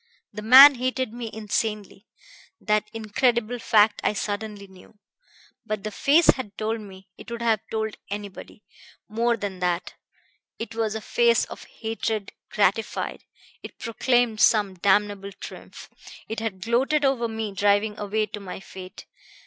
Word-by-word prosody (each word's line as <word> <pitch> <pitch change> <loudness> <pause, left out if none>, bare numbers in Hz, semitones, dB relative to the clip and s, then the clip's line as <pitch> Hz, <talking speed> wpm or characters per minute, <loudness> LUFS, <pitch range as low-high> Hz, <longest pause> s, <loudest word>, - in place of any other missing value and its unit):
The 210 - -6
man 265 +6 +10
hated 255 -1 -2
me 235 -1 -6
insanely. 210 -1 -3 0.5
That 210 0 0
incredible 235 +2 0
fact 215 -2 +3
I - - +2
suddenly 205 0 -4
knew. 190 +2 -18 0.7
But 215 -2 -4
the 215 - -4
face 295 +10 +3
had 210 -6 -8
told 220 +1 -2
me 190 -2 -13
it - - -11
would 235 0 -5
have 225 -2 +2
told 220 -1 -3
anybody 205 0 -8 0.4
more 230 +2 0
than 200 -3 -5
that. 180 -1 -1 0.6
It 230 - -6
was 220 -1 -1
a 220 - -4
face 235 +1 +2
of - - -11
hatred 220 -2 -4 0.2
gratified, 210 +1 -1 0.4
it - - -11
proclaimed 230 0 0
some 205 -4 +4
damnable 200 +1 +1
triumph. - - -11 0.4
It 220 - -4
had 215 -4 -4
gloated 265 +7 +1
over 260 -4 +1
me 220 -2 -4
driving 205 +2 +2
away 215 +1 -1
to 210 0 -8
my 190 -2 -8
fate. 185 0 -11
215 Hz, 145 wpm, -24 LUFS, 205-230 Hz, 0.7 s, man